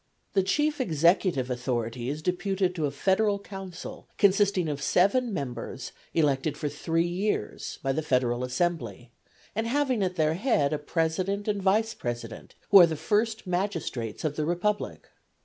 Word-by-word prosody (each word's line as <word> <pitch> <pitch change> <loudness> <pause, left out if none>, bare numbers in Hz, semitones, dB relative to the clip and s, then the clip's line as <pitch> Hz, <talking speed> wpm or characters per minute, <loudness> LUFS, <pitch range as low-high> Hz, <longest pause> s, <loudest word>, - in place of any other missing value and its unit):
The 195 - +4
chief 295 +9 +1
executive 165 - +2
authority 120 -1 -2
is 150 +2 -4
deputed 185 +1 0
to 160 -4 -1
a - - -1
federal 195 +8 +2
council 195 -3 -8
consisting 200 -3 +3
of 145 -2 -3
seven 225 - +3
members 130 - -5 0.2
elected 145 -2 +1
for 150 - -2
three 165 +3 0
years 175 - -2
by 135 - +1
the 155 - -1
federal 125 -4 +1
assembly, 125 - -2 0.4
and 225 +2 -1
having 260 -3 +1
at 185 -1 0
their 155 -2 +2
head 170 - +1
a 150 - -1
president 180 +6 -1
and 205 -2 0
vice 215 +4 +2
president, 120 -2 -6 0.2
who 200 - +10
are 175 - +9
the 160 - -2
first 220 +7 0
magistrates 175 - -2
of 150 -2 -2
the 155 - 0
republic. 190 +5 -1
175 Hz, 155 wpm, -27 LUFS, 140-200 Hz, 0.4 s, who